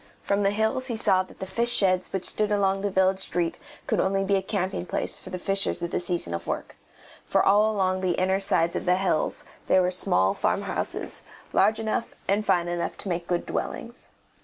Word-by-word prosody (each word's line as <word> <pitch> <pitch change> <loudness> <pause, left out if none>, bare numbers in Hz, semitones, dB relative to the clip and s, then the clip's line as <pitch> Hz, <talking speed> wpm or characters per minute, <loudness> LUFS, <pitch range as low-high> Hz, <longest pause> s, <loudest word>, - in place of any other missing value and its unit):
From 200 0 +1
the 195 - +3
hills 220 +5 0
he 235 -4 -2
saw 190 -3 +4
that 185 - -11
the - - -5
fish 235 +6 -1
sheds 185 -5 +3
which 190 -1 -2
stood 210 -1 +1
along 195 -1 +1
the 205 - 0
village 190 0 +2
street 175 -3 -1 0.3
could - - 0
only 195 +1 +1
be 200 +1 +2
a 195 - +1
camping 190 -2 -2
place - - 0
for - - -11
the 185 - -4
fishers 195 0 0
at 170 - -3
the - - 0
season 175 - -1
of 85 - -5
work, - - -4 0.5
for - - +1
all 210 +2 +4
along 185 -2 0
the 185 -2 +1
inner 190 +1 +2
sides 170 -4 +1
of - - -3
the 180 0 +4
hills 185 -4 0 0.2
there 185 - +4
were 180 - +1
small 95 - +3
farm - - 0
houses, - - -4 0.3
large 215 +2 +4
enough 220 +1 -2
and 205 +2 +1
fine 175 -1 +2
enough 175 0 -3
to 200 - -5
make 175 -1 -2
good 175 -1 -1
dwellings. 235 +2 -5
190 Hz, 215 wpm, -26 LUFS, 180-205 Hz, 0.5 s, saw